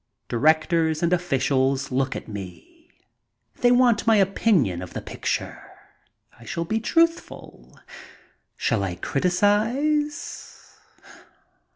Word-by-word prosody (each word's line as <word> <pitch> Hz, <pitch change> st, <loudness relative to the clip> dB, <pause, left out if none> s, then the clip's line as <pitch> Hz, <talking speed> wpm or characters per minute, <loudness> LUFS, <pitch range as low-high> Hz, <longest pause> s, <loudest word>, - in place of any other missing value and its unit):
Directors 160 Hz, +4 st, +2 dB
and 170 Hz, +1 st, +2 dB
officials 135 Hz, -5 st, 0 dB
look 135 Hz, +1 st, -1 dB
at -, -, -7 dB
me. 110 Hz, -, -10 dB, 0.7 s
They 245 Hz, -, +3 dB
want 245 Hz, -3 st, +3 dB
my 225 Hz, -, +5 dB
opinion 190 Hz, -, +2 dB
of 90 Hz, -, -9 dB
the -, -, -4 dB
picture. -, -, -4 dB, 0.8 s
I -, -, -14 dB
shall 170 Hz, +7 st, -4 dB
be 220 Hz, +6 st, -1 dB
truthful. 330 Hz, +8 st, -2 dB, 0.8 s
Shall 115 Hz, -4 st, 0 dB
I 90 Hz, -3 st, -3 dB
criticize 220 Hz, -, -1 dB
170 Hz, 100 wpm, -23 LUFS, -, 0.8 s, my